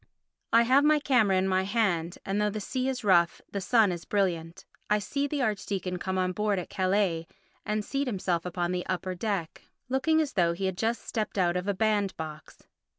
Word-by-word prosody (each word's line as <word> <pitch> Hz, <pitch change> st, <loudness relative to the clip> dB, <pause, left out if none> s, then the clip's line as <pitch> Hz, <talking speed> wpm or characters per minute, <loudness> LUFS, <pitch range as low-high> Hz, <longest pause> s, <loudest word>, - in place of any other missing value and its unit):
I 230 Hz, +1 st, +6 dB
have 260 Hz, +4 st, +4 dB
my 305 Hz, +1 st, +5 dB
camera 240 Hz, -9 st, +3 dB
in 190 Hz, +1 st, +1 dB
my 185 Hz, 0 st, +2 dB
hand 190 Hz, -5 st, 0 dB
and 200 Hz, +2 st, 0 dB
though 210 Hz, -, +2 dB
the 215 Hz, +1 st, -4 dB
sea 255 Hz, +5 st, -2 dB
is 250 Hz, -2 st, -3 dB
rough 175 Hz, -4 st, +4 dB
the 200 Hz, -, -3 dB
sun 215 Hz, 0 st, +4 dB
is 175 Hz, -1 st, -5 dB
brilliant. 170 Hz, -5 st, -1 dB, 0.2 s
I 210 Hz, -, +4 dB
see 280 Hz, +8 st, -2 dB
the 285 Hz, -2 st, -1 dB
archdeacon 195 Hz, -4 st, -2 dB
come 190 Hz, +1 st, -2 dB
on 185 Hz, 0 st, +1 dB
board 210 Hz, +1 st, 0 dB
at 180 Hz, -, -5 dB
Calais 185 Hz, -3 st, +1 dB, 0.4 s
and 210 Hz, 0 st, -1 dB
seat 275 Hz, 0 st, -2 dB
himself 185 Hz, -6 st, -1 dB
upon 175 Hz, 0 st, -2 dB
the 180 Hz, 0 st, -1 dB
upper 185 Hz, 0 st, -2 dB
deck, 185 Hz, -3 st, -3 dB, 0.3 s
looking 290 Hz, +5 st, +2 dB
as 305 Hz, -3 st, -1 dB
though 170 Hz, -3 st, +2 dB
he 190 Hz, +3 st, -3 dB
had 190 Hz, -1 st, -1 dB
just 230 Hz, +2 st, -1 dB
stepped 215 Hz, -2 st, -3 dB
out 175 Hz, -2 st, +2 dB
of 180 Hz, +2 st, -2 dB
a 200 Hz, -, 0 dB
band 205 Hz, -1 st, +1 dB
box. 155 Hz, -2 st, -9 dB
195 Hz, 210 wpm, -28 LUFS, 180-225 Hz, 0.4 s, I